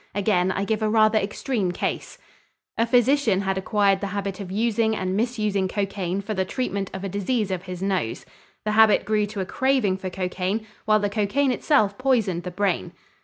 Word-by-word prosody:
Again 190 -3 +2
I 195 +1 -1
give 220 +1 -1
a 215 - +1
rather 215 0 +4
extreme 205 -1 -2
case. 175 - -4 0.6
A 230 - +1
physician 245 -4 +3
had 195 -1 -1
acquired 195 0 +1
the 200 - -2
habit 195 0 -4
of 190 -2 -6
using 220 +1 +1
and 185 -2 -2
misusing 210 -4 0
cocaine 195 -1 -2
for 215 +2 -4
the 190 -2 0
treatment 200 -2 -3
of 190 - -6
a - - -2
disease 205 +2 -1
of 185 0 -3
his 180 0 -6
nose. 190 - -2 0.4
The 215 - +1
habit 220 0 +5
grew 210 -1 +1
to 205 -1 -5
a - - -2
craving 255 -2 +1
for 190 -1 -5
cocaine 185 +3 -2 0.2
while 215 0 +4
the 205 - 0
cocaine 215 +7 +1
itself 215 -6 +1
poisoned 225 -10 +1
the 180 - -5
brain. 185 - -1
200 Hz, 190 wpm, -24 LUFS, 190-220 Hz, 0.6 s, habit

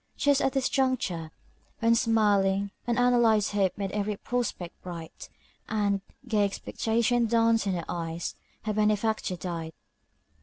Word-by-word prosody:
Just 285 -1 +3
at 270 - +1
this 265 -1 +1
juncture, 250 - 0 0.5
when 230 0 +3
smiling, 200 -4 +2 0.2
unanalyzed 240 -3 +3
hope 195 -3 +1
made 195 -2 -3
every 205 0 -2
prospect 230 -9 -3
bright, 170 -3 -8 0.4
and 200 -2 +1 0.3
gay 215 -3 +2
expectation 230 +3 0
danced 230 -1 +3
in 195 - +1
her 170 -2 -3
eyes, 165 -1 -3 0.3
her 215 -1 -1
benefactor 215 -2 +1
died. 165 -2 -5
210 Hz, 125 wpm, -28 LUFS, 190-230 Hz, 0.5 s, Just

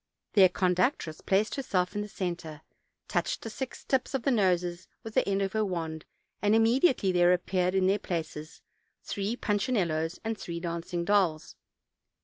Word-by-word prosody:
Their 190 -3 +7
conductress 180 - 0
placed 205 +3 +1
herself 185 -10 -1
in 205 - -2
the 210 - -4
center, 175 -6 -5 0.5
touched - - -1
the 225 - -5
six 260 +3 -6
tips 265 0 0
of 260 - -2
the 275 - +2
noses 180 -5 +1 0.2
with 225 -2 -7
the - - +2
end 195 0 +1
of 195 - -2
her 220 0 +1
wand, 165 -5 -4 0.4
and 210 +1 +3
imme 225 +3 +4
diately 205 - +3
there 175 0 +5
appeared 180 +1 0
in 190 -1 +3
their 195 +2 +3
places 160 -4 -5 0.4
three 205 +3 -2
punchinellos 195 -8 0
and 225 0 -1
three 170 -1 -5
dancing 170 0 -3
dolls. 180 -6 +1
185 Hz, 165 wpm, -29 LUFS, 175-210 Hz, 0.5 s, Their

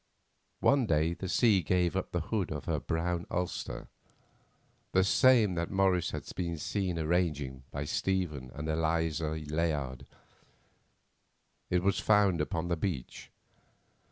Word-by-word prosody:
One 140 -4 +4
day 80 -1 +2
the 90 +2 -6
sea 105 -1 +4
gave 90 +1 +1
up 95 - -2
the 85 - -1
hood 100 -7 0
of 75 -2 -5
her - - 0
brown 85 +1 -2
ulster, 90 0 -3 1.1
the 95 - +5
same 110 +1 +5
that 85 -1 -2
Morris 95 -3 +2
had - - -5
been 85 -2 -2
seen 90 +2 -2
arranging 75 -6 -1
by 70 0 -4
Stephen 75 -5 -1
and 75 +2 -5
Eliza 80 -1 0
Layard; 75 -4 -2 1.6
it 90 0 +1
was 100 0 +2
found 105 -5 +3
upon 85 -3 -2
the 85 - +1
beach. 80 -8 -4
85 Hz, 130 wpm, -31 LUFS, 80-95 Hz, 1.6 s, the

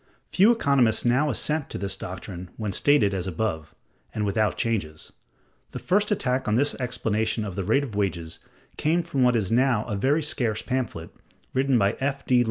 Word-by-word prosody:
Few 200 +5 +5
economists 140 - +2
now 130 +5 +3
assent 150 +3 -1
to - - -5
this 95 0 -2
doctrine 90 -1 -8
when 110 -3 -3
stated 110 -3 +3
as 95 -1 -3
above, 80 -5 -3 0.4
and 105 -1 -1
without 105 +1 0
changes. 95 -10 -3 0.6
The - - -4
first 205 +3 +1
attack 130 - 0
on 105 - +2
this 145 +4 +2
explanation 110 -3 -1
of 100 - -5
the 100 - -3
rate 115 +9 +2
of 120 -7 -6
wages 85 -5 -2 0.4
came 170 +3 +1
from 140 -5 -2
what 125 -1 +4
is 105 -4 0
now 120 -2 +2
a 105 - -3
very 140 +10 +1
scarce 120 -8 -1
pamphlet, 125 -11 -3 0.4
written 135 -1 +2
by 100 0 +1
F. 140 0 -2
D. 125 -1 +4
115 Hz, 180 wpm, -25 LUFS, 100-135 Hz, 0.6 s, Few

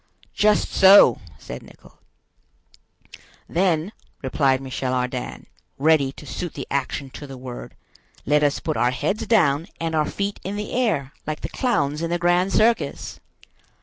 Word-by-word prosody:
"Just 210 0 +2
so," 195 +1 +7 0.2
said - - -8
Nicholl. - - -18 1.5
"Then," 175 0 +1 0.3
replied 135 0 +2
Michel 130 -1 -3
Ardan, 125 0 -3 0.3
ready 145 -2 +3
to 150 - -12
suit 175 +2 -5
the 135 - -5
action 140 0 -2
to 145 - -9
the 135 -1 -9
word, 125 -1 -9 0.5
"let 150 +1 +3
us 145 -1 +1
put 155 - -3
our 120 - +3
heads 160 - -2
down 165 -8 +3
and 165 -1 -2
our 155 -1 +1
feet 200 0 -3
in 195 +2 -4
the 210 0 -5
air, 170 - 0
like 155 0 -3
the - - -4
clowns 150 - 0
in 165 - -2
the 175 - 0
grand 175 +2 +2
circus." 230 +3 +1
155 Hz, 150 wpm, -23 LUFS, 135-190 Hz, 1.5 s, so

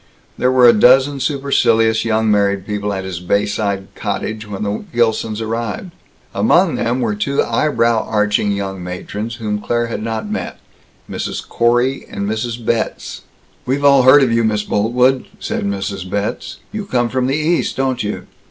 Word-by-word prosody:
There 125 - +1
were 125 -1 +6
a 120 - +8
dozen 135 +5 +4
supercilious 115 -6 +2
young 110 -1 +1
married 100 -2 +1
people 105 -1 -3
at 95 -1 -3
his 95 -2 -5
bayside 100 +1 -1
cottage 105 +1 -4
when 100 0 -5
the 105 - -3
Gilsons 115 -2 0
arrived. 115 - -4 0.4
Among - - +3
them 120 +2 -1
were 110 -3 0
two 140 +7 0
eyebrow 115 -3 +1
arching 105 -1 +1
young 95 -2 -4
matrons 105 +5 -5
whom 105 -3 -3
Claire 120 +2 0
had 115 -2 -5
not 115 - -3
met 215 +1 -4 0.5
Mrs. - - -5
Corey 120 +3 +1
and 100 - -4
Mrs. 110 +2 -2
Betz. 115 -1 -2 0.5
"We've 140 +3 0
all 140 -1 +6
heard 130 +3 +7
of 125 - +1
you, 115 0 +2
Miss 105 -1 0
Boltwood," 125 +6 +1
said - - -3
Mrs. 100 -2 -3
Betz. 100 +2 -3
"You 215 -2 -5
come 120 -8 +1
from 125 +2 -1
the 135 +2 0
East, 160 +3 0
don't 130 -2 0
you?" 105 0 -4
115 Hz, 165 wpm, -17 LUFS, 105-125 Hz, 0.5 s, a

